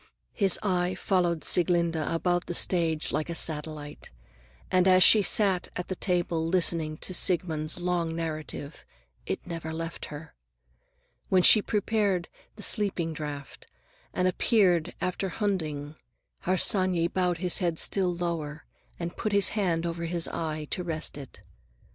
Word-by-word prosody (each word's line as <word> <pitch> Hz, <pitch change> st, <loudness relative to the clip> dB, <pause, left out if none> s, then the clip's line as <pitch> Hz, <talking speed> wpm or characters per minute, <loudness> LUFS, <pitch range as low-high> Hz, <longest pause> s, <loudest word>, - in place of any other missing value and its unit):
His 195 Hz, -5 st, +3 dB
eye 180 Hz, -2 st, 0 dB
followed 175 Hz, -5 st, 0 dB
Sieglinde 170 Hz, -1 st, +2 dB
about 170 Hz, +3 st, -1 dB
the 175 Hz, -, -2 dB
stage 165 Hz, -4 st, +1 dB
like 155 Hz, -, -2 dB
a 170 Hz, -, -3 dB
satellite, 150 Hz, -2 st, -5 dB, 0.6 s
and 185 Hz, 0 st, +3 dB
as 185 Hz, -1 st, +6 dB
she 215 Hz, -, +7 dB
sat 195 Hz, -2 st, +2 dB
at 180 Hz, -, -5 dB
the 185 Hz, -, -2 dB
table 175 Hz, -3 st, -1 dB
listening 165 Hz, -2 st, +1 dB
to 185 Hz, -, -2 dB
Siegmund's 170 Hz, -3 st, +2 dB
long 175 Hz, -2 st, -1 dB
narrative, 155 Hz, -2 st, -5 dB, 0.4 s
it -, -, -3 dB
never 165 Hz, -3 st, -5 dB
left 165 Hz, +1 st, -5 dB
her. 150 Hz, +1 st, -10 dB, 1.0 s
When 185 Hz, -1 st, +4 dB
she 215 Hz, -, +8 dB
prepared 205 Hz, -4 st, 0 dB, 0.3 s
the 210 Hz, -, -6 dB
sleeping 185 Hz, -6 st, 0 dB
draught 145 Hz, -2 st, -7 dB, 0.4 s
and 180 Hz, -, -1 dB
disappeared 185 Hz, -3 st, +2 dB
after 185 Hz, +1 st, -2 dB
Hunding, 155 Hz, -8 st, -3 dB, 0.5 s
Harsanyi 185 Hz, -1 st, +3 dB
bowed 180 Hz, -1 st, 0 dB
his 180 Hz, 0 st, 0 dB
head 170 Hz, -3 st, -1 dB
still 185 Hz, 0 st, +1 dB
lower 165 Hz, -3 st, -4 dB, 0.3 s
and 170 Hz, 0 st, -5 dB
put 215 Hz, -, -3 dB
his 200 Hz, -1 st, +4 dB
hand 175 Hz, -6 st, -1 dB
over 170 Hz, 0 st, -3 dB
his 170 Hz, 0 st, -1 dB
eye 155 Hz, -2 st, -4 dB
to 180 Hz, -, -1 dB
rest 160 Hz, -3 st, -4 dB
it. 140 Hz, -3 st, -11 dB
175 Hz, 140 wpm, -27 LUFS, 160-185 Hz, 1.0 s, she